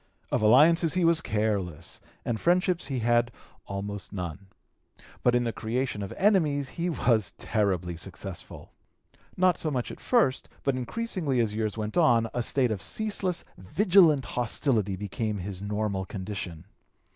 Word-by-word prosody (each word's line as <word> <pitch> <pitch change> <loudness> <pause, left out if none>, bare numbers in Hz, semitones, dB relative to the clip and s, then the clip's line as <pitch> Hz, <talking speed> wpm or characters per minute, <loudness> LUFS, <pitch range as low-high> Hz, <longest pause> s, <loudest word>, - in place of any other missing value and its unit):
Of - - +1
alliances 155 +10 +5
he 180 -2 +2
was 165 -1 +4
careless, 105 - -2 0.2
and 115 -2 -1
friendships 180 -2 +2
he 135 -3 -2
had 120 +1 +2 0.4
almost 100 0 -5
none. 90 0 -6 0.7
But 125 0 +3
in 120 - +2
the 115 -1 -2
creation 120 -1 -2
of 100 - -5
enmities 155 -9 +2
he 175 +1 -2
was 115 - +1
terribly 95 -5 -1
successful. 95 +2 -8 0.7
Not 185 -1 +3
so 155 - -1
much 125 -5 -2
at - - -10
first, 225 - +1
but 135 -2 +1
increasingly 150 - -2
as 110 -3 +1
years 110 0 -2
went 110 +4 -3
on, 120 -9 +4
a 120 - 0
state 125 0 +2
of 100 -3 -3
ceaseless, 200 -5 -1
vigilant 165 - +4
hostility 115 -4 0
became 105 +2 -3
his 95 0 -5
normal 105 -2 -2
condition. 95 -4 -6
115 Hz, 145 wpm, -27 LUFS, 100-155 Hz, 0.7 s, alliances